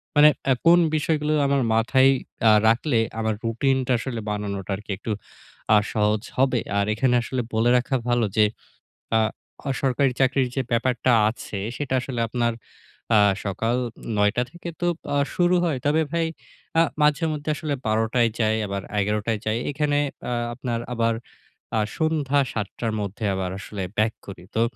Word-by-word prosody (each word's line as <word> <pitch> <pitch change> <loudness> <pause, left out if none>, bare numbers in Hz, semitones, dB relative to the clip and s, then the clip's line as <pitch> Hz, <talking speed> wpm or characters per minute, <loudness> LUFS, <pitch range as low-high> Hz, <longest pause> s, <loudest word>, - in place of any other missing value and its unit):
মানে 150 +1 +8 0.2
এ - - +7
কোন 170 +1 +7 0.2
বিষয়গুলো 155 0 0
আমার 140 -1 +2
মাথায় 130 +4 +4 0.4
আ - - +7 0.2
রাখলে 115 +2 +2 0.2
আমার 110 -1 0
রুটিনটা 130 +3 +1
আসলে 120 -3 -4
বানানোটা 100 -2 -3
আরকি 105 +1 -8
একটু 110 - -5 0.6
আ - - +8 0.2
সহজ 105 0 +2 0.2
হবে। 130 -2 +3 0.2
আর 100 - +2
এখানে 125 +2 +2
আসলে 130 0 -2
বলে 115 +2 +3
রাখা 130 +2 -1
ভালো 120 -1 +2
যে 105 - +6 0.7
আ - - +5 0.5
বেসরকারি 135 0 +1
চাকরির 130 -1 +3
যে 135 - +1
ব্যাপারটা 125 +1 +1 0.2
আছে, 110 -2 -5 0.2
সেটা 140 -3 -3
আসলে 125 -2 -4
আপনার 120 0 0 0.6
আ - - +7 0.3
সকাল 115 +4 -1 0.4
৯ঃ০০ 105 0 +3
টা 125 - +2
থেকে 175 0 -8
তো 175 - 0 0.3
আ - - +3 0.2
শুরু 180 0 +3
হয়। 155 -6 0
তবে 155 +2 +3
ভাই, 165 -1 +1 0.5
আ - - +7 0.2
মাঝেমধ্যে 150 0 +1
আসলে 155 -2 -2
১২ঃ০০ 110 +3 +1
য় 115 - 0
যাই, 110 0 +2
আবার 100 -1 -3 0.2
১১ঃ০০ 105 +2 -1
য় 105 - -5
যাই। 110 +2 +1
এখানে 145 0 0 0.3
আ - - -1 0.2
আপনার 120 -2 -3
আবার 115 -1 +1 0.6
আ - - +3 0.2
সন্ধ্যা 150 -3 +1
৭ 105 -3 -2
টার 115 -2 -1
মধ্যে 100 +2 -5
আবার 95 -1 -2
আসলে 100 -1 -6 0.2
back 110 +1 +2
করি। 95 -2 -9
তো, 115 - +3
120 Hz, 165 wpm, -24 LUFS, 110-140 Hz, 0.7 s, মানে